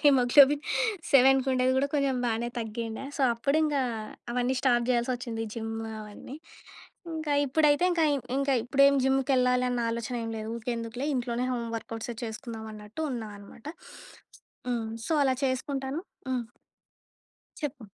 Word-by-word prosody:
Haemoglobin 280 +2 +6 0.5
7కి 270 0 +6
ఉండేది, 255 0 +2
కూడా 275 +2 +3
కొంచెం 275 -3 +2
బాగానే 235 +1 -1
తగ్గిండె. 225 +2 -4
సో, - - -4
అప్పుడింక 295 +5 +1 0.6
అవన్నీ 250 +1 0
స్టార్ట్ 240 -2 +3
చెయ్యలసొచ్చింది 240 -2 -1
జిమ్ 225 -1 -4 0.3
అవన్నీ. 215 +6 -9 0.8
ఇంకా 310 -2 -2
ఇప్పుడైతే 300 +4 +3
ఇంకా, 330 -2 +2 0.3
ఇంకా 275 -1 +2
ఇప్పుడేం 275 +2 +5
జిమ్‌కేళ్ళాలి 255 -2 +2
అన్న, 245 -1 -1
ఆలోచన 235 +2 -3
ఏమి 225 0 -4
లేదు. 220 0 -5
ఊకే 235 +1 -3
ఎందుకులే 230 +4 -4
ఇంట్లోనే 245 0 -1
హోమ్ 235 -2 -3
వర్కౌట్సే 225 +1 -6
చేసుకుందాం, 220 0 -6
అన్నట్టు 210 +5 -9
ఉన్నామనమాట. 215 +1 -8 1.0
హ్మ్, 230 -2 -1 0.2
సో, - - -1
అలా 260 -1 +3
చేసుకుంటాను. 270 +2 -2 0.3
హ్మ్. 250 -2 -1 1.2
చెప్పు. 285 -4 -4
250 Hz, 125 wpm, -28 LUFS, 230-275 Hz, 1.2 s, Haemoglobin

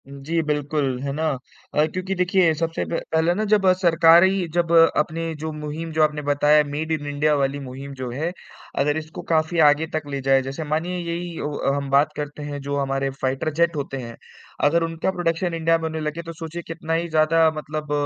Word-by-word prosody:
हुँ, 140 0 -10
जी, 165 +2 +1
बिल्कुल, 145 -3 -1
है 140 0 -2
ना? 160 +2 -1 0.5
अ, 150 - +3
क्योंकि 185 +1 -2
देखिए 180 -2 +3
सबसे 165 0 -1
प 165 - 0
पहले 160 +2 +3
ना 215 - -1
जब 205 -2 +3 0.2
सरकार 170 -1 +6
ही 190 -1 +2
जब 170 -1 +1 0.3
अपने 165 +2 -1
जो 160 +1 -4
मुहिम 150 +2 -5
जो 155 0 +3
आपने 150 -1 +1
बताया 150 +1 +4
मेड 150 +3 -4
इन 150 -2 -2
इंडिया 145 +1 +1
वाली 140 0 0
मुहिम 135 +1 -8
जो 130 -2 -5
है, 155 +8 -2 0.5
अगर 145 +2 +2
इसको 155 0 -7
काफ़ी 160 +1 +1
आगे 150 +2 +4
तक 155 -2 -3
ले 140 -1 -3
जाए। 135 0 +3
जैसे 135 +4 -5
मानिए 160 +4 -2
यही 170 0 -4
औ 145 -2 -1
हम 140 -1 -3
बात 140 +2 +4
करते 145 0 -5
हैं 145 -1 -5
जो 140 +1 -3
हमारे 135 0 -1
फाइटर 135 +4 -1
जेट 170 +1 +2
होते 140 -2 -4
हैं, 115 -2 -7 0.5
अगर 165 +3 +3
उनका 165 +2 -1
प्रोडक्शन 175 -1 -1
इंडिया 165 0 +2
में 165 - -8
होने 160 0 -3
लगे 155 +2 -3
तो 165 0 -7
सोचिए 165 +1 -6
कितना 165 0 -4
ही 170 +1 0
ज़्यादा 160 +1 +4
मतलब 150 0 -5
155 Hz, 210 wpm, -23 LUFS, 145-165 Hz, 0.5 s, सरकार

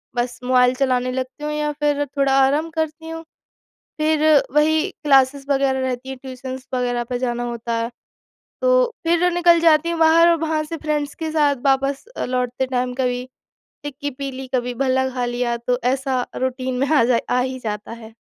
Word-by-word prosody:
बस 240 0 -2
मोबाइल 250 0 +3
चलाने 255 -1 0
लगती 260 +3 -5
हूँ 300 - -2
या 300 0 -1
फिर 290 -1 +1
थोड़ा 275 0 0
आराम 300 +4 0
करती 320 0 -3
हूँ। 325 0 -6 0.8
फिर 310 0 +2 0.3
वही 310 +1 +4 0.2
क्लासेस 275 -1 +3
वगैरह 270 -1 +2
रहती 260 0 -3
हैं 265 - -6
ट्यूशन्स 260 0 -7
वगैरह 245 -1 -1
पे 245 +1 -4
जाना 240 -1 -2
होता 235 -1 -4
है, 230 0 -2 0.7
तो - - +3
फिर 345 +1 +2
निकल 345 -1 +5
जाती 325 0 +4
हूँ 335 - -3
बाहर 330 +1 +6
और 335 - +3
वहाँ 315 -1 0
से 325 +2 -6
फ्रेंड्स 300 -2 -2
के 320 -1 -4
साथ 295 -2 +2
वापस 275 +2 +1
अ, - - -1
लौटते 250 0 -1
टाइम 250 -1 -1
कभी 250 -1 -1 0.6
टिक्की 290 0 -5
पी 275 +1 -5
ली, 260 0 -7
कभी 245 -1 -1
भल्ला 260 +1 +1
खा 250 -1 -2
लिया 240 0 -1
तो 245 +1 -1 0.2
ऐसा 265 -2 -2
रूटीन 260 0 -2
में 275 +2 0
आ 290 -6 +5
जा 235 -1 +3
आ 250 - +2
ही 260 +1 -2
जाता 210 0 -4
है। 225 -1 -11
265 Hz, 185 wpm, -21 LUFS, 250-300 Hz, 0.8 s, बाहर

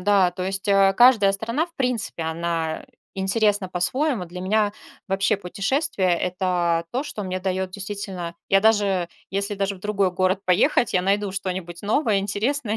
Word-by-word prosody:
да. 195 -1 +3
То 180 +1 -6
есть, 195 0 -3
э, 195 -1 +5
каждая 235 -6 +6
страна, 230 +10 -1
в 340 - -25
принципе, 250 - -2
она 160 0 -2 0.3
интересна 200 0 +1
по-своему. 215 - 0
Для 180 +2 -8
меня 205 +2 +1 0.4
вообще 195 +2 +1
путешествие- 200 - -1
это 180 -2 0
то, 255 - 0
что 215 -8 -6
мне 185 0 -3
даёт 190 0 -2
действительно 195 -3 -5
я 195 - +4
даже, 200 -5 +2 0.2
если 200 +2 -2
даже 195 0 -1
в 185 - -15
другой 200 -2 0
город 185 +1 +1
поехать, 210 - +3
я 180 - +2
найду 200 +1 0
что-нибудь 185 -3 -4
новое, 215 0 +2
интересное 215 +4 -1
195 Hz, 160 wpm, -23 LUFS, 185-210 Hz, 0.4 s, каждая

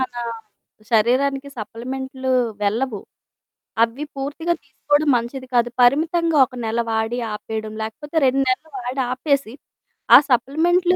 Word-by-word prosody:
మనా 245 -2 -3 0.7
శరీరానికి 270 +5 +2
సప్లిమెంట్లు 260 +4 -4 0.3
వెళ్ళవు. 215 +1 -1 0.8
అవ్వి 235 +6 0
పూర్తిగా 290 +5 -2
తీసుకోవడం 295 +1 0
మంచిది 245 +3 -4
కాదు. 240 0 +3
పరిమితంగా 320 +6 +3
ఒక 255 - -17
నెల 225 +1 0
వాడి 225 +2 -1
ఆపేయడం, 215 0 -5
లేకపోతే 295 +9 -7
2 270 +1 +2
నెలలు 280 +5 -1
వాడి 255 +2 -3
ఆపేసి, 275 -2 0 0.6
ఆ - - +13
సప్లిమెంట్లు 335 +9 +2
260 Hz, 115 wpm, -21 LUFS, 235-285 Hz, 0.8 s, ఆ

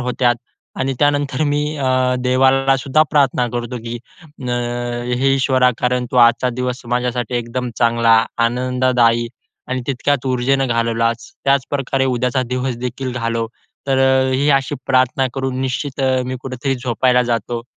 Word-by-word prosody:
होत्यात 125 -1 +1 0.5
आणि 135 +1 0
त्यानंतर 145 -1 +1
मी 145 0 +1 0.2
अ, 130 -2 +1
देवाला 135 +1 +3
सुद्धा 135 +3 +2
प्रार्थना 135 -4 +2
करतो 120 +1 -4
की 115 +1 -4 0.3
"अ, 145 -5 -8 0.6
हे 135 +2 +2
ईश्वरा 130 -1 +3
कारण 125 0 0
तू - - -3
आजचा 120 +1 +5
दिवस 125 +1 -3
माझ्यासाठी 125 -1 -1
एकदम 120 +1 -3
चांगला, 115 -1 +4 0.2
आनंददायी 120 -1 +2 0.4
आणि 130 0 -2
तितक्याच 140 0 -1
ऊर्जेनं 130 +1 +1
घालवलास, 115 0 -1
त्याचप्रकारे 135 -1 0
उद्याचा 130 0 0
दिवस 125 -1 -2
देखील 125 +1 -4
घालव." 115 -2 -2 0.4
तर 135 -1 +1
अ, 130 0 +3
ही 140 +3 +1
अशी 135 +1 +1
प्रार्थना 130 0 +2
करून 130 -1 -2
निश्चित 135 +2 -3
अ, 130 -1 +1
मी 130 0 -3
कुठेतरी 135 +1 -2
झोपायला 125 0 +1
जातो. 115 0 -3
130 Hz, 140 wpm, -18 LUFS, 120-135 Hz, 0.6 s, आजचा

